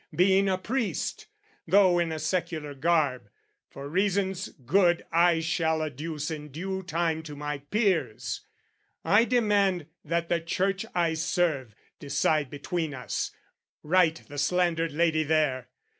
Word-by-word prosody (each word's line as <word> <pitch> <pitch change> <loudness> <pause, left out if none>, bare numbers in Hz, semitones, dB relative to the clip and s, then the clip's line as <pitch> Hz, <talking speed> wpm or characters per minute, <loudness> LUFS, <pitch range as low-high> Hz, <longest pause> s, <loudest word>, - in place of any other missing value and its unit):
Being 190 +2 +4
a 185 - +1
priest, 230 +4 -2 0.4
"Though 185 0 +5
in 170 -1 0
a 160 - -3
secular 155 -2 -2
garb, 140 -6 +1 0.4
for 140 +1 -8
reasons 190 +2 0
good 175 +6 +1
"I 170 0 +4
shall 160 -1 0
adduce 155 +1 -4
in 150 -1 -6
due 190 +6 -4
time 165 -2 -1
to 155 -2 -9
my 145 0 -4
peers, 145 - -1 0.6
"I 215 +4 +5
demand 205 -8 +2 0.2
that 170 +2 -1
the 170 0 +1
Church 190 +5 -1
I 170 -2 +2
serve, 160 - -1 0.2
decide 145 0 +1
"Between 150 +2 -3
us, 125 - -3 0.5
right 165 0 +3
the 145 0 -6
slandered 165 0 +1
lady 160 +1 +2
there. 150 -5 +1
165 Hz, 130 wpm, -27 LUFS, 150-185 Hz, 0.6 s, Though